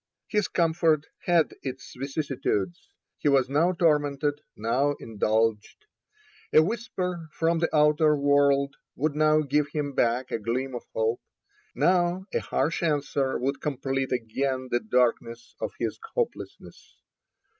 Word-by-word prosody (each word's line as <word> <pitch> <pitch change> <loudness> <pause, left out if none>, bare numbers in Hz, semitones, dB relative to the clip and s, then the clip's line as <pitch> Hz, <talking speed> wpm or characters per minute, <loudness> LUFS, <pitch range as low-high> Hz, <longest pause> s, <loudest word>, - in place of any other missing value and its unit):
His 210 -2 +1
comfort 160 -3 +2 0.2
had 170 -3 +3
its 130 -1 -7
vicissitudes; 135 - -2 0.3
he 145 - +2
was 135 -2 +3
now 165 +5 +3
tormented, 145 -3 +1
now 125 +7 +1
indulged. 110 - -1 0.7
A 155 - +7
whisper 180 -5 -3
from 165 0 +1
the 170 - +1
outer 150 0 +4
world 140 -1 +3 0.2
would 150 +2 0
now 155 0 +4
give 145 0 +1
him 145 -2 -3
back 120 0 +1
a - - -1
gleam 125 +4 -2
of 120 - -6
hope, 110 +1 0 0.5
now 180 +1 +2
a - - +2
harsh 165 - -1
answer 145 -4 0
would 135 +2 -2
complete 135 -2 -2
again 130 +2 -2
the 120 - +2
darkness 115 0 0
of - - -2
his - - -3 0.2
hopelessness. 480 -2 -5
140 Hz, 130 wpm, -26 LUFS, 125-160 Hz, 0.7 s, A